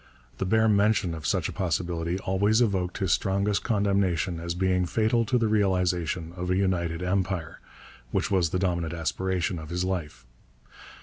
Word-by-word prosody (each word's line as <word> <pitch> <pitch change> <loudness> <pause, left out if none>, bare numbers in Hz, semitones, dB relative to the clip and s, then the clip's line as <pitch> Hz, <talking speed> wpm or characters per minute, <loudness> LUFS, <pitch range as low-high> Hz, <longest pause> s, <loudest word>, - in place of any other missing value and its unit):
The 95 - -1
bare 110 +3 +3
mention 100 -4 +2
of 80 -4 -5
such - - +1
a - - -5
possibility 85 -1 -1
always 100 +3 +1
evoked 95 -7 0
his 95 -5 0
strongest 100 +3 +1
condemnation 100 -5 +1
as 85 +1 -4
being 90 -1 +1
fatal 115 +4 +1
to 125 +3 +1
the 115 -2 +1
realization 90 -5 0
of 90 0 -4
a 90 - +2
united 90 -3 0
Empire, 90 -3 -2 0.5
which - - -1
was 90 -4 +2
the 90 - -1
dominant 85 -3 -1
aspiration 90 +1 -1
of 80 -1 -9
his 90 +1 -1
life. 75 -9 -4
95 Hz, 165 wpm, -27 LUFS, 85-100 Hz, 0.5 s, bare